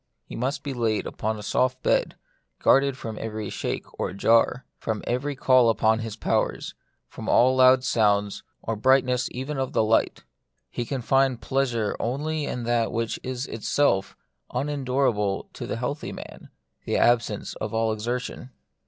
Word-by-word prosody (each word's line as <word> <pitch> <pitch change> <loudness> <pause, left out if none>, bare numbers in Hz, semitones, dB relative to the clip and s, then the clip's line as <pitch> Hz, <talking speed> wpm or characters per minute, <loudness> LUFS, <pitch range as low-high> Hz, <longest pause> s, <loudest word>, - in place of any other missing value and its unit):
He - - -9
must 130 +4 -2
be 140 - -3
laid 115 -4 0
upon 110 +1 -3
a 105 - -8
soft 130 +5 0
bed, - - +1 0.4
guarded 135 -1 +3
from 110 -4 -6
every 110 -2 -4
shake - - -3
or - - -2
jar, 115 +5 +3
from 110 -2 -3
every 140 +4 -1
call 130 -3 +4
upon 110 0 +2
his 115 -2 -5
powers, - - -1 0.3
from - - -7
all 130 +2 +5
loud 130 0 +6
sounds, 105 -5 +1 0.2
or 115 - -2
brightness 130 +2 +2
even 135 +3 -4
of 130 - -2
the - - +3
light. 110 +1 +1 0.5
He 120 - -3
can 130 0 -4
find 135 -1 +2
pleasure 120 -3 0
only 150 +5 -2
in 125 - -4
that 115 -1 +1
which 115 0 -2
is 130 0 -4
itself 115 -3 0 0.3
unendurable 130 -7 0
to - - -6
the - - -3
healthy 140 +5 -3
man, - - -10 0.4
the - - 0
absence 120 -2 +1
of - - -4
all 115 0 +1
exertion. 120 +3 -4
120 Hz, 160 wpm, -25 LUFS, 110-130 Hz, 0.5 s, loud